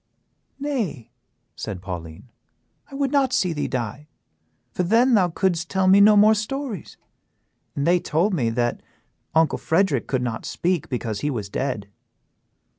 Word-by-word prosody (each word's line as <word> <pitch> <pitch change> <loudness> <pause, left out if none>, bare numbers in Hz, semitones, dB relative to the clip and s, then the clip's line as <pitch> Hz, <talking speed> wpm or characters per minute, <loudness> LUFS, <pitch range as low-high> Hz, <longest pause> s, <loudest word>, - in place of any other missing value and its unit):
"Nay," 220 - -3 0.4
said 100 -4 -5
Pauline, 90 +4 -8 0.6
"I 275 - -10
would 275 -1 -1
not 275 -3 +2
see 185 -9 +1
thee 150 - -2
die, 125 +4 -4 0.6
for - - -2
then 230 +8 +3
thou 190 -5 +4
couldst 175 -1 -1
tell 190 -1 +1
me 195 +2 +7
no 210 +1 +7
more 215 +2 +7
stories; 220 - -4 0.8
for - - -2
they 175 +5 +3
told 170 +6 0
me 125 -10 +1
that 120 +1 -1 0.5
uncle 160 0 +3
Frederick 160 -6 +1
could 130 -2 -1
not 115 -2 -3
speak 180 -2 -1
because 115 -5 -3
he 150 - -1
was 110 -8 -4
dead." 105 -4 -3
170 Hz, 150 wpm, -23 LUFS, -, 0.8 s, me